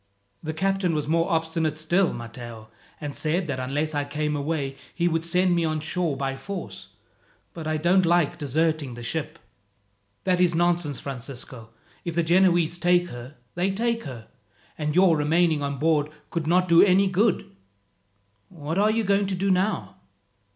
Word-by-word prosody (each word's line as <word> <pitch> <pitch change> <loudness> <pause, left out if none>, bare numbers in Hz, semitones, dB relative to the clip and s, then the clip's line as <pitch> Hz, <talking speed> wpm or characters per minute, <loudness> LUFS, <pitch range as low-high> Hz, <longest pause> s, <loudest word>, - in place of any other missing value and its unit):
"The 155 - -3
captain 195 -1 0
was 150 -1 -2
more 165 +3 +1
obstinate 160 -2 0
still, 170 +4 +2
Matteo, 115 -1 -8 0.3
and 145 -2 -5
said 165 +4 0
that 140 -5 -3
unless 145 +5 -2
I 145 0 0
came 150 +1 -2
away 140 -2 -2 0.2
he 175 0 +1
would 165 -1 0
send 180 +1 +2
me 170 - +1
on 155 -1 0
shore 160 -1 -2
by 135 0 -2
force; 190 +5 -7 0.7
but 160 -2 -6
I 155 0 0
don't 175 +4 +3
like 170 -3 +2
deserting 155 -2 0
the 120 - -8
ship." 155 +5 -3 0.9
"That 180 -1 +2
is 175 -2 +3
nonsense, 170 -4 +1
Francisco. 125 -3 -7 0.3
If 170 -2 -4
the 170 - +2
Genoese 175 -1 +3
take 175 +1 +3
her, 120 +4 -9 0.2
they 180 +3 0
take 230 +4 -1
her, 120 -6 -8 0.5
and 150 0 -2
your 185 -2 +5
remaining 155 +1 +2
on 140 -1 -2
board 150 0 +2 0.2
could 165 -3 -2
not 180 +2 +3
do 170 0 +7
any 195 0 +5
good. 190 - 0 0.9
What 160 0 -4
are 210 +1 +4
you 225 +1 +1
going 200 0 +2
to 190 - -2
do 195 +2 +1
now?" 190 +3 0
165 Hz, 170 wpm, -25 LUFS, 145-180 Hz, 0.9 s, do